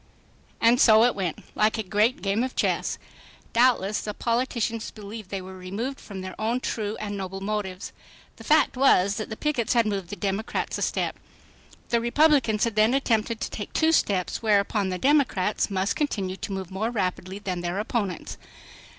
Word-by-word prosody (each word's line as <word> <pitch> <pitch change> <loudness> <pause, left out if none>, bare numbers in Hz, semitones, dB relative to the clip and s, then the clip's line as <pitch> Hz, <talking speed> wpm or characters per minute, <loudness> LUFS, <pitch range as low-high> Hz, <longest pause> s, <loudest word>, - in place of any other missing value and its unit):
And 235 +2 +4
so 220 -1 +7
it 245 0 +4
went—like 200 +4 -1
a 220 - -2
great 210 +2 +1
game 200 +4 +1
of 260 - -4
chess. - - 0 0.6
Doubtless 230 -4 +3
the 210 -1 -5
politicians 235 -1 -1
believed 210 -1 -9
they 195 -2 -4
were 190 +1 -9
moved 215 +9 -4
from 195 -3 -8
their 185 0 -6
own 230 +3 0
true 215 -4 -3
and 205 -1 -4
noble 195 -1 -5
motives. 195 -2 -4 0.5
The - - -11
fact 310 -2 +3
was 200 -7 +4
that 215 - -4
the 220 - -6
pickets 270 -8 0
had 235 -1 +4
moved 195 -4 -2
the 205 - -5
Democrats 200 +1 -2
a - - -5
step. - - -1 0.7
The 235 -1 +2
Republicans 240 -3 +3
had 230 -3 0
then 215 +4 +4
attempted 230 -4 0
to - - -3
take 205 - -6
two 320 0 +3
steps, 195 - +1
whereupon 205 -2 +2
the 185 - -2
Democrats 260 - +2
must 195 +1 0
continue 195 -11 -1
to 195 - -6
move 190 -1 -5
more 205 +4 -1
rapidly 190 -3 -2
than 185 -3 -4
their 175 +2 -3
opponents. 205 -4 -3
215 Hz, 175 wpm, -25 LUFS, 195-235 Hz, 0.7 s, so